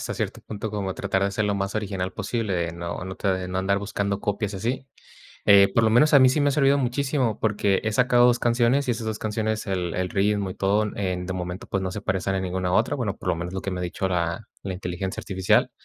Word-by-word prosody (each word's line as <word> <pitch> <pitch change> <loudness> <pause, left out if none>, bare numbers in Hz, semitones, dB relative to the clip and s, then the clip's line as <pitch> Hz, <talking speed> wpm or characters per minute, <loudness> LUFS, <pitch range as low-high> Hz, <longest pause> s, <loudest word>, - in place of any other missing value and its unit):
hasta - - -4
cierto - - -3
punto 110 0 -5
como 100 -3 -3
tratar 95 0 -1
de 100 - 0
ser 105 +2 -1
lo 105 -1 +1
más 100 +1 -2
original 95 -3 -2
posible, 115 -5 -2
de 85 -1 -1
no 85 +1 -5
no 95 0 -6
te 95 -2 -1
no 95 +1 -2
andar 100 +1 +1
buscando 100 0 -2
copias 105 0 -2
y - - -3
así. 125 +6 -3 0.6
Eh, 100 -1 +6
por 115 - +4
lo 110 - +4
menos, 145 +6 +5
a 140 - +8
mí 130 - +7
sí 145 +4 +1
me 145 - +3
ha - - +3
servido 140 -1 +3
muchísimo, 130 -2 0
porque 105 -2 +1
he 110 - 0
sacado 125 +1 +4
2 120 -1 +4
canciones, 120 +3 +2
y 120 - +2
esas 115 -1 -5
2 110 -1 -2
canciones, 110 0 -2
el 90 -3 -2
el 90 0 -1
ritmo 100 -1 +1
y - - -6
todo 100 +2 +2
en 90 -2 -2
de 95 - -3
momento, 90 0 -5
pues, 95 -1 -2
no 95 - -2
se 105 - -5
parecen 95 -1 -1
a - - -1
ninguna 90 0 -2
otra. 115 +8 +2
Bueno, 110 -7 -2
por - - -6
lo 90 - +3
menos 85 +2 -5
lo 95 - -2
que 100 - -4
me 90 -1 -3
ha - - -3
dicho 90 +2 -2
la 85 -2 -2
la 95 - -4
inteligencia 90 0 -4
artificial. 95 -1 +2
100 Hz, 260 wpm, -25 LUFS, 95-110 Hz, 0.6 s, a